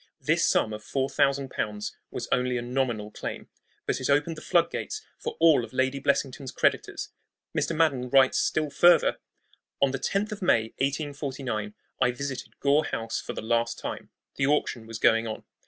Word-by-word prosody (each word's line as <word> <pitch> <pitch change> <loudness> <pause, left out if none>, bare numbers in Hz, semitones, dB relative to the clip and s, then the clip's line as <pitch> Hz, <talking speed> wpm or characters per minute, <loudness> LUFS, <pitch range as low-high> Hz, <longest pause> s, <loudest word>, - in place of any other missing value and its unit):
This - - +1
sum 110 - +2
of 105 0 -7
four 135 0 -1
thousand 140 -1 +1
pounds 105 0 -3
was - - -5
only 125 0 +1
a 120 - -3
nominal 120 -4 -1
claim, - - -6 0.4
but - - -1
it 130 - -1
opened 145 +4 +2
the 155 - -10
flood - - +2
gates 430 0 -5
for - - -5
all 160 -6 +6
of 115 - -9
Lady 130 +1 +1
Blessington's 140 -1 -1
creditors. - - 0 0.5
Mr. 165 - 0
Madden 140 -6 +2
writes 135 0 +5
still 155 -2 0
further: 175 +2 +5 0.6
On 140 -1 +3
the 135 - -3
10th 200 - -1
of 210 - -6
May, 115 -11 +3
1849, 135 -6 -2 0.3
I 125 - +4
visited 140 0 -6
Gore 145 +2 +3
House 115 0 -3
for - - -6
the - - -6
last 115 +1 0
time. - - -6 0.3
The 135 - +2
auction 135 -6 0
was 115 -1 -6
going 115 +1 +3
on. 110 - -5
135 Hz, 180 wpm, -27 LUFS, 115-145 Hz, 0.6 s, all